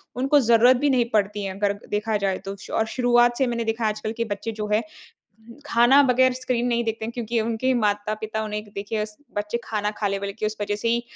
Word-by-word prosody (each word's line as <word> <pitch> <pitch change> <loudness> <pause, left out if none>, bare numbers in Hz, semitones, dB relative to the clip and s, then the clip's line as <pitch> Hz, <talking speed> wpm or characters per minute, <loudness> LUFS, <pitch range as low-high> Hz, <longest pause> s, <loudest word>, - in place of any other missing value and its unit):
उनको 270 +4 +3
ज़रूरत 240 0 +5
भी 290 +3 +1
नहीं 250 -3 +3
पड़ती 205 -1 +1
है, 195 -1 -3
अगर 200 0 +1 0.2
देखा 210 +1 -1
जाए 190 -1 +1
तो। 195 - -4 0.2
और 220 - +2
शुरुआत 240 0 +3
से 265 - +2
मैंने 235 -1 -1
देखा 225 +1 -2
है 215 - +3
आजकल 215 +1 -4
के 230 - 0
बच्चे 215 +3 -5
जो 210 -1 -3
है 215 - +3 0.9
खाना 250 +3 +5
बगैर 255 +1 +4
स्क्रीन 250 -1 -1
नहीं 235 -1 +1
देखते 225 -1 -3
हैं 230 - -4
क्योंकि 235 -1 -2
उनके 230 +3 0
माता-पिता 215 0 -1
उन्हें 210 0 -4
देखिए 210 +2 -2
स 210 0 -14 0.2
बच्चे 210 +3 -2
खाना 210 -1 -2
खा 205 - +1
लें 200 0 -1
बोले 200 0 -4
कि 215 +1 -3
उस 215 0 -3
वज़ह 205 0 -1
से 220 +3 -2
ही 235 +1 +1
225 Hz, 230 wpm, -24 LUFS, 210-240 Hz, 0.9 s, ज़रूरत